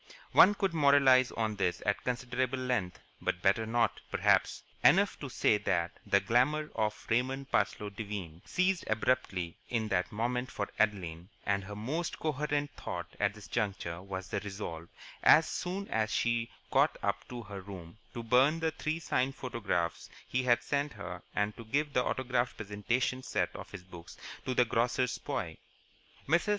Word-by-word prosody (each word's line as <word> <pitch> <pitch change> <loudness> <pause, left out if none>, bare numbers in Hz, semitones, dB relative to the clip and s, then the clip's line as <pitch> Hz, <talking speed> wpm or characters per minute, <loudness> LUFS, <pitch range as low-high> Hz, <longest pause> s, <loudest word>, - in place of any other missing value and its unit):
One 205 - +7
could 195 -3 0
moralize 140 -4 +5
on 110 -2 -1
this 90 -2 0
at 100 -1 0
considerable 125 +1 -1
length, 125 -8 -1 0.2
but 90 - -2
better 105 +3 +3
not, 115 0 +1
perhaps. - - +2 0.2
Enough 200 +3 +5
to 140 - -5
say 105 -3 +2
that 85 -3 0 0.2
the 100 - +5
glamour 130 +9 +2
of 105 -1 -2
Raymond 130 +4 0
Devine 100 -5 -2
ceased 185 0 +1
abruptly 110 -6 0
in 110 -3 -1
that 90 -2 0
moment 125 +4 -1
for 100 - -3
Adeline, 90 -5 0 0.2
and 100 -1 +1
her 105 +1 -7
most 145 +11 -3
coherent 145 -1 -1
thought - - -6
at 100 0 +1
this 105 -1 -11
juncture 95 -6 -2
was 95 -2 -6
the - - -1
resolve, 95 -5 -6 0.3
as 160 - +7
soon 190 +3 -3
as 110 -1 0
she 120 -1 +1 0.2
got - - +3
up - - -1
to 120 -1 -6
her 100 -2 -7
room, 95 0 -10 0.2
to 120 - -4
burn 130 +7 +4
the 160 0 0
three 155 +1 -2
signed 135 -4 0
photographs 105 -9 -2 0.2
he 130 - 0
had 120 -2 +3
sent 140 +3 -1
her 90 -4 -7
and 105 0 0
to 115 - -8
give 145 +6 -1
the 125 - +3
autographed 125 -2 -1
presentation 110 +5 -1
set - - -1
of - - -8
his 95 - -9
books 85 -2 -12 0.3
to 130 - 0
the 125 - +5
grocer's 120 +2 +1
boy. - - -4 0.7
Mrs. 170 +7 +2
115 Hz, 165 wpm, -31 LUFS, 100-130 Hz, 0.7 s, One